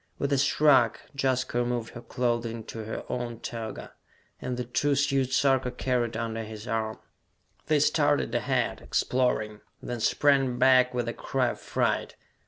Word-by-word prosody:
With 140 0 -1
a - - +3
shrug, 140 -4 +4 0.2
Jaska 130 -3 0
removed 120 -2 -2
her 120 - -8
clothing 120 -1 -2
to 110 0 -7
her 110 - -5
own 120 -2 -4
toga, 115 -2 -6 0.5
and 125 -1 -3
the 125 - -2
two 140 +4 0
suits 135 -2 +1
Sarka 135 -2 +2
carried 120 -3 -1
under 115 0 -3
his 110 0 -9
arm. 110 -1 -2 0.7
They - - +3
started - - +2
ahead, - - 0
exploring, 110 -4 0 0.2
then 120 -1 -5
sprang 135 +1 +2
back 125 -1 +5
with 120 -1 -1
a 120 - -2
cry 130 -2 -1
of - - -6
fright. - - -1
125 Hz, 155 wpm, -27 LUFS, 115-130 Hz, 0.7 s, back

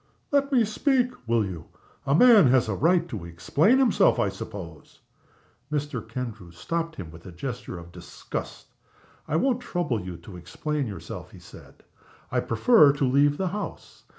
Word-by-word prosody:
'" - - -43
"Let 280 0 +2
me 245 -4 +4
speak, 250 +3 +1 0.2
will 115 -2 +2
you! 90 -4 -7 0.4
A 140 - +3
man 220 - +7
has 125 -2 +3
a 110 - -1
right 170 - +2
to 110 - -6
explain 115 - +2
himself, 235 -7 +4
I 100 - +1
suppose?" 90 -5 -9 0.7
Mr. 145 -4 -2
Kendrew 115 -6 -6
stopped 165 - -4
him 85 -5 -8
by 80 - -12
a 95 - -10
gesture 120 +2 -6
of 85 0 -11
disgust. - - -8 0.5
"I 155 - -1
won't 250 +8 +1
trouble 175 - -2
you 90 -1 -7
to 90 +2 -12
explain 140 - -3
yourself," 95 -5 -8
he - - -14
said. - - -15 0.5
"I - - +1
prefer 145 - +5
to 145 -1 0
leave 145 +3 +3
the 190 -1 -1
house. 210 +3 -7
135 Hz, 170 wpm, -26 LUFS, -, 0.7 s, man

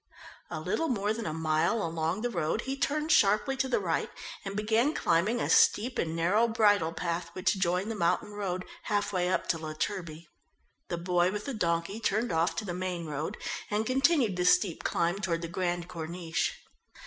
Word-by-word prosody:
A - - -4
little 325 - -1
more 210 -5 0
than 230 0 -4
a - - -1
mile 160 +7 +1
along 165 +5 -2
the 245 - 0
road 170 +3 -1
he 265 +2 -3
turned 305 +2 0
sharply 215 +5 +4
to 265 - +1
the 255 - +1
right 170 -5 -1 0.3
and 195 0 -5
began 225 +8 +2
climbing 185 +8 +2
a - - 0
steep 240 +4 +4
and 165 -1 -1
narrow 190 +8 +3
bridle 205 -7 +3
path 170 0 -3
which 190 +2 0
joined 185 +4 0
the - - -3
mountain 175 +2 0
road, 185 -3 -3 0.2
half 205 -1 0
way 180 -1 +1
up 185 - 0
to 165 - +1
La 155 -1 -5
Turbie. 170 -2 -4 0.6
The 175 - -3
boy 175 +1 +2
with 210 +1 -4
the 275 - -3
donkey 170 0 -1
turned 220 +2 0
off 165 +1 +1
to 215 - -3
the 180 - -3
main 180 -2 -3
road 155 +6 -4 0.3
and 215 +1 0
continued 260 - +2
the 180 - 0
steep 180 -1 +3
climb 170 +3 0
toward 170 -4 -1
the - - -2
Grande 175 0 -2
Corniche. 165 -2 -2
185 Hz, 195 wpm, -29 LUFS, 170-215 Hz, 0.6 s, sharply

